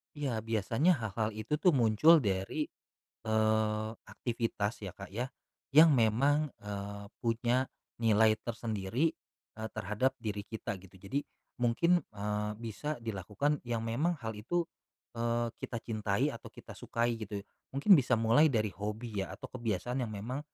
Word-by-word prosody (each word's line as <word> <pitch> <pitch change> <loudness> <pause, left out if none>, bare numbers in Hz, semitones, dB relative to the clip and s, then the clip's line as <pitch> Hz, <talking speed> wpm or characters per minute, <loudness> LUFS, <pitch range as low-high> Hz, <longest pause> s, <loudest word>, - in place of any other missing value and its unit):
Iya. 130 -7 -2
Biasanya 115 - +2
hal-hal 110 0 -1
itu 110 +7 -2
tuh 175 +4 +4
muncul 135 +5 +6
dari, 100 +6 -1 0.6
eee, 110 0 +2 0.2
aktivitas 115 -3 -2
ya 95 -4 -6
Kak 95 -1 -9
ya, 125 +4 -2 0.4
yang 155 +2 +8
memang, 135 +6 +3 0.2
eee, 100 0 -5 0.2
punya 120 +2 +1 0.3
nilai 110 -1 +5
tersendiri, 115 +5 -1 0.5
eee, 110 - -3
terhadap 110 +6 0
diri 105 -5 -3
kita 105 -3 -4
gitu. 95 0 -16
Jadi, 100 +9 -2 0.4
mungkin, 170 +9 +3
eee, 105 -2 -3
bisa 115 +7 -4
dilakukan 110 +8 -1
yang 115 -1 -1
memang 150 +10 0
hal 110 - -2
itu, 130 +12 -1 0.5
eee, 115 0 0
kita 120 - -4
cintai 110 +5 0
atau 115 - -9
kita - - -12
sukai 115 0 -1
gitu. 100 -2 -5 0.3
Mungkin 145 +9 +5
bisa 130 -8 +6
mulai 115 +8 +5
dari 110 -6 0
hobi 105 +1 -4
ya 95 - -3
atau - - -8
kebiasaan 120 +1 -2
yang - - -7
memang, 110 +6 -4
115 Hz, 145 wpm, -32 LUFS, 105-130 Hz, 0.6 s, yang